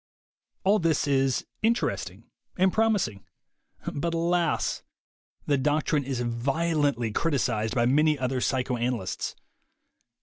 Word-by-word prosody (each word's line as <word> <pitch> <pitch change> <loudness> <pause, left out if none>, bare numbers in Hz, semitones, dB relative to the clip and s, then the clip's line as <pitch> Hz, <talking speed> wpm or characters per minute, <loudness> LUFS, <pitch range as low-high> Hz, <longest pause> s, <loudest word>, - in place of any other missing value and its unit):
All 205 +3 +4
this 165 -3 +1
is 135 -2 +1 0.2
interesting 100 - -1 0.3
and 190 0 +3
promising. 205 - +1 0.7
But 165 +3 -2
alas! 170 +1 0 0.6
The 145 -2 +2
doctrine 150 0 +1
is 130 -2 -2
violently 135 +1 0
criticized 120 -6 0
by 120 -2 +3
many 150 +4 +3
other 130 -1 -1
psychoanalysts. 125 -6 -1
140 Hz, 100 wpm, -27 LUFS, 120-165 Hz, 0.7 s, All